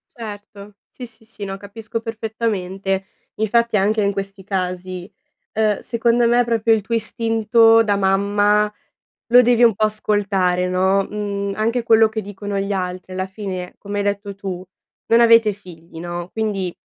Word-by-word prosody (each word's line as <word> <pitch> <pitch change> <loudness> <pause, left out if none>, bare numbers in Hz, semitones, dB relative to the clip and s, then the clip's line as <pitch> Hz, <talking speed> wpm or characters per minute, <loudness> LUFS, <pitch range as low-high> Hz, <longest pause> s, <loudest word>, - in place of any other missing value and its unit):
Certo. 205 -2 -10
Sì, 250 - -9
sì, 225 -1 -21
sì. 220 -2 -10
No, 195 -1 -5
capisco 215 +3 -6
perfettamente. 205 -4 -3 0.3
Infatti, 230 +1 +1
anche 210 +2 +2
in 200 - +2
questi 195 0 -6
casi, 185 -1 -4 0.4
uhm, 215 -2 +1
secondo 235 0 +1
me 240 +1 +4
proprio 230 -1 +1
il 220 - +1
tuo 215 +4 -5
istinto 225 0 +3
da 205 -2 +1
mamma 205 +2 +2 0.6
lo 245 +1 +9
devi 245 0 +3
un 230 -2 +6
po' 215 +2 +1
ascoltare, 200 -4 0
no, 190 +2 +2
mhmm, 200 -1 -3
anche 230 +3 0
quello 225 -1 +4
che 220 0 -4
dicono 205 0 -5
gli 195 +1 -2
altri 185 -1 -4
alla 185 0 -2
fine, 190 -2 -6
come 205 0 -5
hai 205 - 0
detto 200 0 -3
tu: 190 -2 -6 0.4
"Non 230 - +4
avete 230 -2 +6
figli." 170 -5 -13
No? 175 +1 -5
Quindi, 205 -5 -2
205 Hz, 160 wpm, -20 LUFS, 195-225 Hz, 0.6 s, lo